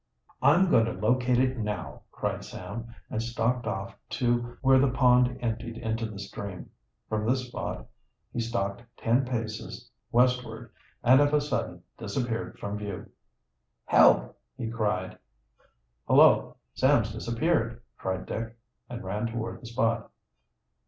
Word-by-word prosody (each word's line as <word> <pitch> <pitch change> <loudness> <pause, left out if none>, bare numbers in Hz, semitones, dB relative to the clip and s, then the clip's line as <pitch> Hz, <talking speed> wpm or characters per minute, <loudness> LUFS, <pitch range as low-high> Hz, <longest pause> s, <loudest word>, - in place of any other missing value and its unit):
"I'm 155 +8 +5
going 115 - +5
to 115 - -2
locate 120 +5 +2
it 130 0 +1
now," 105 -1 -4
cried - - -3
Sam, 115 +2 -7 0.2
and 110 - -1
stalked 115 +1 -1
off 95 -2 -4
to 120 -1 0
where 135 0 +6
the 135 0 +4
pond 125 -1 +4
emptied 115 0 -3
into 115 0 -2
the 105 - -8
stream. 100 -1 -7 0.4
From 110 -1 -1
this 130 0 +1
spot 125 - -5 0.5
he - - -2
stalked 115 -3 -2 0.2
ten 120 +4 +2
paces 120 0 -5 0.2
westward, 120 -2 +1 0.3
and 130 +3 +7
of 145 +1 +3
a - - +5
sudden 90 -12 -3 0.2
disappeared 115 +2 -3
from 100 +1 -4
view. 100 -2 -6 0.7
"Help!" - - +5 0.2
he 115 -3 -3
cried. 105 -5 -1 0.9
"Hullo, - - +5 0.2
Sam's 130 -5 +3
disappeared!" 115 +1 0 0.2
cried 95 0 -3
Dick, 115 0 -5 0.3
and 120 -1 -6
ran 105 +4 -2
toward 115 0 -5
the 120 - -9
spot. 115 -1 0
115 Hz, 135 wpm, -28 LUFS, 110-125 Hz, 0.9 s, and